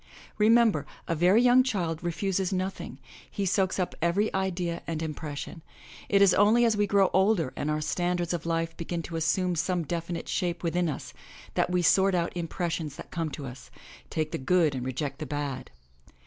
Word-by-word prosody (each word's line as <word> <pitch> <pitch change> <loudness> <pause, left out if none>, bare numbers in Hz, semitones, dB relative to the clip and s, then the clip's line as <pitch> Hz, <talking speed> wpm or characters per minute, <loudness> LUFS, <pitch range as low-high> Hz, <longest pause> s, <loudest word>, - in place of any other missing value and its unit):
Remem 225 +1 +6
ber, - - -4 0.2
a 170 - 0
very 180 +8 +4
young 250 +1 +6
child 180 -11 -2
refuses 185 +2 -1
nothing 190 0 -3 0.2
— - - -20
he 200 - +1
soaks 190 0 +1
up 180 -2 -1
every 175 +6 +1
idea 180 -3 -2
and 165 -2 -2
impression 155 -1 -5 0.2
— - - -17
it 200 - +7
is 195 - +6
only 220 +4 +5
as 225 -2 +3
we 205 0 +1
grow 195 -1 +3
older 190 -6 +2
and 145 - -2
our 155 0 0
standards 175 +3 -1
of 165 -1 -4
life 165 0 -1
begin 170 0 -4
to 165 - -7
assume 175 +3 +1
some 175 +1 0
definite 170 +1 -4
shape 175 -2 -2
within 170 0 0
us, 145 - -6 0.4
that - - +1
we 180 0 +1
sort 190 +3 +4
out 170 0 -1
impressions 165 -3 -3
that - - -10
come 165 -2 -2
to 145 -1 -7
us, 125 0 -10 0.4
take 155 -1 -2
the - - -3
good 160 +2 +2
and 130 -1 -4
reject 135 +1 -3
the 155 - -5
bad. 145 -2 -4
175 Hz, 195 wpm, -28 LUFS, 160-190 Hz, 0.4 s, it